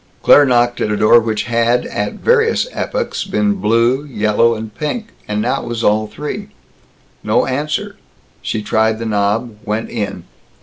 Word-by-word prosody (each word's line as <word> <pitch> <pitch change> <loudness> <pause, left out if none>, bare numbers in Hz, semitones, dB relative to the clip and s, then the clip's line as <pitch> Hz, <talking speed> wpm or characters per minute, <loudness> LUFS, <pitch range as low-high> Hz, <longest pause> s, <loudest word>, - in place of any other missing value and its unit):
Claire 145 - +7
knocked 120 -1 +2
at - - 0
a 105 - 0
door 110 +3 +6
which 110 -2 -2
had 120 +1 +1
at 105 0 -3
various 455 -1 +2
epochs - - -3
been 210 -1 0
blue, 120 - +1
yellow, 115 -2 +1
and 110 -1 -7
pink, 210 - -4 0.2
and 105 0 -1
now 130 +3 0
was 115 -1 -4
all 105 +1 +2
three. 150 - -6 0.8
No - - +2
answer. 145 +4 -3 0.4
She 110 - -3
tried 110 +1 +1
the 115 - -5
knob, 105 +2 -1
went 110 0 -3
in. 105 -4 -4
115 Hz, 160 wpm, -17 LUFS, 110-135 Hz, 0.8 s, Claire